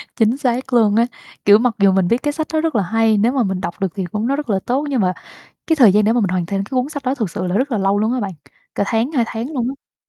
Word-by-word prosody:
Chính 225 +4 +2
xác 255 -1 -2
luôn 215 -3 +4
á, 230 +1 +4 0.4
kiểu, 205 +1 +7
mặc 245 -1 0
dù 195 -1 +5
mình 190 -2 +2
biết 235 - +2
cái 290 0 0
sách 315 -1 -3
đó 310 - +2
rất 325 -6 -1
là 205 - +2
hay, 225 +2 +2
nếu 230 +4 +2
mà 265 -3 +1
mình 190 -2 -2
đọc 170 +3 -5
được 195 - 0
thì 190 -2 -3
cũng 210 +6 -3
nó 275 - +1
rất 290 -5 -5
là 195 -2 +1
tốt. 270 +5 0
Nhưng 255 -6 0
mà 185 -1 +1 0.5
cái 320 - +2
thời 230 -9 +6
gian 210 0 +3
để 220 - +3
mà 240 - +2
mình 195 - +1
hoàn 180 -2 -1
thành 195 +1 -2
cái 200 - -16
cuốn 255 +1 0
sách 285 -3 -6
đó 260 +1 0
thực 220 -10 -3
sự 180 - -4
là 180 - -2
rất 265 +2 0
là 220 - 0
lâu 195 +1 +1
luôn 220 +3 +1
á 255 - -1
bạn, 200 -2 -3 0.4
cả 200 - 0
tháng, 230 +6 0
2 245 -5 +2
tháng 235 +7 -5
luôn 250 -3 -1
á. 275 - -10
225 Hz, 325 wpm, -19 LUFS, 200-260 Hz, 0.5 s, kiểu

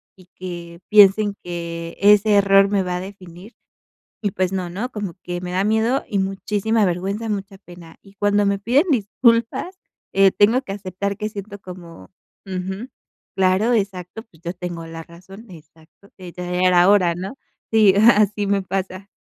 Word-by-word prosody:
y 185 -1 -20
que 170 -2 -8
piensen 205 0 +5
que 170 -1 -6
ese 205 +1 +5
error 195 0 +5
me 200 -1 +1
va 180 -1 -3
a - - -4
definir. 190 +2 -11 0.7
Y 205 -3 -1
pues 185 0 -1
no, 185 -2 -3
¿no? 205 +8 -4
Como 205 -5 -5
que 175 0 -5
me 180 - -6
da 185 +2 0
miedo 220 +5 +1
y 200 - -2
muchísima 200 +3 0
vergüenza, 195 +5 -2
mucha 195 -1 -4
pena, 175 -3 -15
y 195 - -19
cuando 205 0 +1
me 200 0 +1
piden 255 - +2
disculpas, 235 - +1 0.4
eh, 195 -1 +5
tengo 225 +6 +3
que 200 - -8
aceptar 200 0 -4
que 215 0 -3
siento 205 0 -8
como 180 -3 -12 0.4
Ujú, 190 +4 -5 0.5
claro 190 +5 +2
Exacto, 195 0 -3
pues 170 -8 -25
yo 170 +1 -5
tengo 175 -2 -6
la 165 0 -8
razón 185 +6 -14
Exacto, 160 +3 -18
eh, 180 -2 -10
ya 180 - -6
era 180 0 +4
hora, 185 -4 +4
¿no? 190 +9 -7 0.3
Sí, 215 -4 +5
así 210 -1 +4
me 200 -1 +1
pasa. 190 0 -4
195 Hz, 170 wpm, -21 LUFS, 180-210 Hz, 0.7 s, piensen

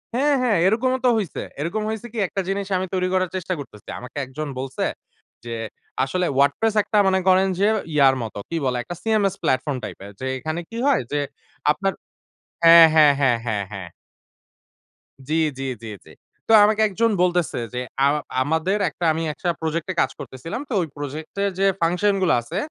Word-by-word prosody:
হ্যাঁ, 285 +3 +3
হ্যাঁ। 230 -6 +2
এরকমও 255 +5 +2
তো - - +6
হইছে। 200 -6 -3 0.2
এরকম 175 +8 -2
হইছে 220 +2 -4
কি 235 - -7
একটা 195 +1 -3
জিনিস 195 0 -2
আমি 185 - -1
তৈরি 185 -1 +1
করার 185 -1 +1
চেষ্টা 185 0 -2
করতেছি। 105 -7 -11
আমাকে 125 +3 -10
একজন 145 +4 -6
বলছে 130 0 -4 0.6
যে, - - -7 0.5
আসলে 180 +7 -1
WordPress 145 +11 +2
একটা 210 - -1
মনে 190 0 +3
করেন 190 +1 +5
যে 200 - +3 0.3
ইয়ার 140 -2 +5
মতো। 110 -2 -7
কি 165 - -3
বলে? 125 -1 0
একটা 175 - -7
CMS 215 -4 +1
প্ল্যাটফর্ম 135 +1 0
টাইপের। 100 +1 -8
যে 130 - -5
এখানে 155 +6 -4
কি 230 - -7
হয়? 280 - +3
যে 145 - 0 0.5
আপনার 195 +5 -1 0.7
হ্যাঁ, 165 0 +10
হ্যাঁ 150 -2 +7
,হ্যাঁ, 125 -4 +4
হ্যাঁ, 105 -3 -1
হ্যাঁ। 95 -3 -7 1.4
জি, - - 0 0.3
জি, - - -3 0.2
জি, - - -6 0.2
জি। - - -16 0.4
তো - - +1
আমাকে 215 +1 +3
একজন 225 +3 +1
বলতেছে 175 -2 +1 0.2
যে, - - -4 0.3
আ 140 - +6 0.3
আমাদের 160 +8 +1
একটা 165 +3 -5
আমি 160 - -3
১ - - -12
টা - - +3
প্রজেক্ট 160 +1 -2
এ - - -3
কাজ - - +1
করতেছিলাম। 165 - -6
তো - - -3
ওই 165 - -2
প্রজেক্ট 145 +2 -6
এর 200 - +1
যে 195 - +3 0.2
ফাংশন 180 +5 +2
গুলো 185 - +3
আছে, 160 +11 -6
175 Hz, 190 wpm, -22 LUFS, 145-200 Hz, 1.4 s, হ্যাঁ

